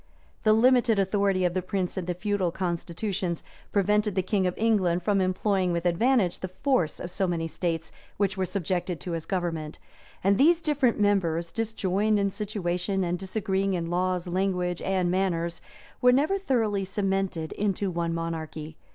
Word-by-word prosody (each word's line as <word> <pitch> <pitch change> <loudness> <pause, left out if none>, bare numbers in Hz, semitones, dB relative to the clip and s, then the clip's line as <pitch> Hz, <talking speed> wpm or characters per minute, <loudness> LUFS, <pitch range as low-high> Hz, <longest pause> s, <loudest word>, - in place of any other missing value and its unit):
The 215 - +4
limited 240 0 +4
authority 195 -1 +2
of 175 - +1
the 185 - 0
prince 185 0 -2
in 185 - -3
the 180 0 -2
feudal 200 -1 0
constitutions, 175 0 -3 0.3
prevented 210 0 +2
the 190 - +1
king 190 -1 +1
of 180 - -3
England 190 -6 +2
from 200 0 +2
employing 185 0 +1
with 170 0 -2
advantage 195 +2 +2
the 185 - -4
force 185 - 0
of 175 - -6
so 190 +1 0
many 165 -2 -1
states 165 -1 -3 0.3
which 195 -1 +1
were 190 -1 -1
subjected 180 -2 -2
to 180 - -5
his 165 -1 -4
government; 165 -5 -2 0.5
and 195 +1 +3
these 330 +4 +5
different 290 -8 +1
members, 170 -5 +1
disjoined 215 -2 0
in 200 -1 +1
situation, 190 -2 -2
and 175 0 -1
disagreeing 195 -1 -1
in 170 -1 -3
laws, 180 0 0
language, 180 -1 -1
and 185 -2 0
manners, 170 -3 0 0.4
were 250 - +6
never 300 +10 +2
thoroughly 225 - +1
cemented 195 -4 -1
into 200 -1 -1
one 170 -1 -1
monarchy. 160 -2 -5
190 Hz, 165 wpm, -27 LUFS, 175-205 Hz, 0.5 s, were